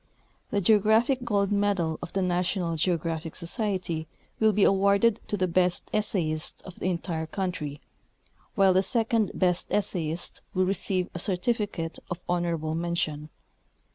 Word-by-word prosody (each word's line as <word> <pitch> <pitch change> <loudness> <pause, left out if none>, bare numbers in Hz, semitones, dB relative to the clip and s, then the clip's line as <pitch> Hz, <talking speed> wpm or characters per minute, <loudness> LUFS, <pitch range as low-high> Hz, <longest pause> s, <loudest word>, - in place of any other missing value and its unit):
The 200 - 0
Geographic 220 +6 +4
Gold 205 -4 +1
Medal 200 -6 +1
of 175 - -6
the 195 - +1
National 180 -1 0
Geographic 165 -1 -1
Society 175 -3 -2 0.3
will 220 0 +5
be 205 0 +2
awarded 200 +3 +4
to 205 - -1
the 185 -1 +1
best 180 0 +2
essayist 170 -7 -1
of 185 - -11
the - - -1
entire 170 -2 -2
country, 170 -6 -4 0.7
while 195 -3 +5
the 185 - +4
second 225 -1 +1
essayist 180 -2 -1
will 185 0 +3
receive 185 -1 +1
a 175 - -5
certifi 205 +4 0
cate 165 -1 -5
of 175 - -4
honorable 170 -3 -1
mention. 160 -3 -2
185 Hz, 140 wpm, -27 LUFS, 170-205 Hz, 0.7 s, will